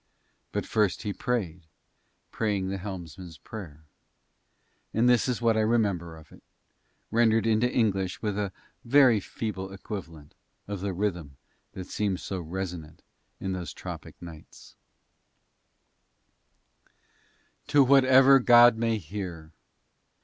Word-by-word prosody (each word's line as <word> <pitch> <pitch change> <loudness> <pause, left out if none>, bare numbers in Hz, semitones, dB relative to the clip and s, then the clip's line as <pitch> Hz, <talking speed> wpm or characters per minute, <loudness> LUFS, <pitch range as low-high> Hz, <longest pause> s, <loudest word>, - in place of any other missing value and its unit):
But - - -3
first 105 -3 0
he 105 -2 -3
prayed, 90 -10 -3 0.6
praying 100 -4 -1
the 95 0 -4
helmsman's 90 -3 -8
prayer. 80 -2 -10 1.1
And 115 +2 +3
this 125 0 +3
is 125 -1 -2
what 115 -1 +3
I - - +1
remember 100 -7 0
of 80 - -17
it, - - -16 0.7
rendered 115 -1 +3
into 115 +2 +2
English 95 -6 0
with 105 -3 -2
a 100 -2 -2 0.3
very 125 -3 +5
feeble 95 -2 -5
equivalent 85 -6 -8 0.3
of 100 -1 -4
the 100 0 -2
rhythm 85 -7 -3 0.4
that 95 - -7
seemed 100 -2 -2
so 95 - -5
resonant 85 -2 -6 0.4
in 95 - -3
those 90 -5 -5
tropic - - -9
nights 85 -3 -13 2.9
To 145 -1 +5
whatever 135 0 +6
god 120 -1 +6
may 115 -1 0
hear. 85 -4 -7
100 Hz, 120 wpm, -27 LUFS, 90-115 Hz, 2.9 s, whatever